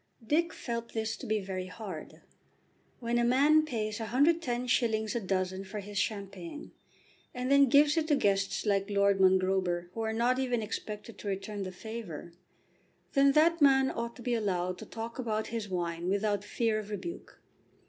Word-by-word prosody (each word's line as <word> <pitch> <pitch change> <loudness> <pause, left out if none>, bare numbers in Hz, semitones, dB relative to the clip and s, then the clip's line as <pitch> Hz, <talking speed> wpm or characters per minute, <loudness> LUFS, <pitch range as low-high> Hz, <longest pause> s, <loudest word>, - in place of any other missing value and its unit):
Dick 330 +7 +2
felt 235 -1 -5
this 220 0 -1
to - - -9
be 215 0 +1
very 190 -2 -4
hard. 185 -5 -8 0.8
When 240 0 0
a - - +2
man 290 +6 +5
pays 215 -6 -3
110s. 240 -4 +1
a 240 - 0
dozen 190 -1 -1
for 200 +2 -6
his 205 0 -4
champagne, 195 - -4 0.6
and 250 +2 -2
then 280 0 +7
gives 290 +2 +5
it 315 -1 +1
to 300 - +4
guests 200 -4 +1
like 200 -1 +1
Lord 200 -1 +3
Mongrober 185 -2 +2
who 225 - -4
are 220 0 -1
not 240 +3 +1
even 245 -4 0
expected 210 +1 -6
to - - -7
return 200 +1 -3
the 185 -1 -4
favour, 185 -5 -7 0.8
then 275 -1 +5
that 325 +2 +4
man 270 -2 +5
ought 235 0 -4
to 245 - -11
be 245 - 0
allowed 185 -5 -1
to - - -9
talk 230 +2 -6
about 220 -3 -1
his 220 -3 -3
wine 175 -1 -2
without 205 0 0
fear 220 +1 0
of 210 -1 -8
rebuke. 275 +12 -7
220 Hz, 170 wpm, -30 LUFS, 195-245 Hz, 0.8 s, then